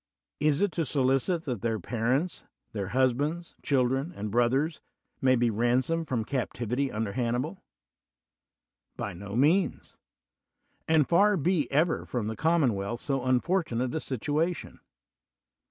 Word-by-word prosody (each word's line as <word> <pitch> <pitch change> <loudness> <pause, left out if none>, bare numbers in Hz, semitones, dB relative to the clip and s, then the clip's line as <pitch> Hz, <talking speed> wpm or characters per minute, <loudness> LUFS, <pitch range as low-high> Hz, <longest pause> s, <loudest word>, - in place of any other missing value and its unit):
Is 150 +3 +2
it 205 - +1
to 165 +1 -1
solicit 135 +4 +1
that 125 - -4
their 115 -1 -1
parents, 125 - -1 0.3
their 100 -3 -3
hus 130 +4 +3
bands, 155 +6 -3
children, 135 +3 +1
and 105 0 -4
brothers 130 +7 +1 0.4
may 130 -1 +4
be 120 -1 +2
ransomed 125 +9 +1
from 115 -4 -1
captivity 125 +1 -2
under 105 -1 -2
Hannibal? 125 - -2 1.4
By 100 - -4
no 100 +4 -7
means: 160 +9 +1 0.9
and 160 -3 +4
far 200 +4 +4
be 165 0 0
ever 160 +4 +1
from 120 -4 -2
the 110 +1 -3
com 165 +3 +2
monwealth 105 -2 0
so 135 0 -1
unfortunate 130 -1 0
a 160 - -1
situation. 150 +6 -2
130 Hz, 135 wpm, -28 LUFS, 120-160 Hz, 1.4 s, may